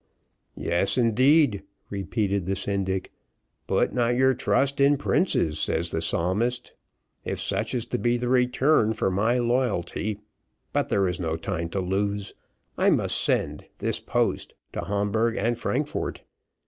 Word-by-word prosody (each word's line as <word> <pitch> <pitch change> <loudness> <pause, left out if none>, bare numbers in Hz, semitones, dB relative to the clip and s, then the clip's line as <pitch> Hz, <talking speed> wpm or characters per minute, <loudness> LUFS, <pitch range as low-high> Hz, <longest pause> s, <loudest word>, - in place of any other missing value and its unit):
"Yes, 90 +7 0
indeed," 125 - +4 0.3
repeated 100 -1 -1
the 95 - 0
syndic, 95 -1 -2 0.6
"'put - - +1
not 120 -1 +1
your 130 +1 +4
trust 135 +2 +1
in 140 +1 +5
princes,' 125 - +1
says 85 +1 0
the 80 - -1
psalmist. 105 +10 -1 0.5
If - - -3
such 110 +4 -1
is 120 -2 -1
to 125 - -3
be 120 0 +2
the 120 0 -3
return 125 -1 +3
for 95 -3 0
my 110 +6 +2
loyalty 120 -4 -1 0.5
but - - 0
there 100 -1 +2
is 90 -2 -2
no 80 -2 -2
time 85 0 -3
to 95 +3 -2
lose. 100 +2 -2 0.5
I - - +4
must - - +1
send - - 0
this - - -1
post, - - -1 0.2
to - - -4
Hamburgh 105 +3 0
and 115 +3 +1
Frankfort. 145 +5 -2
110 Hz, 145 wpm, -25 LUFS, 95-125 Hz, 0.6 s, in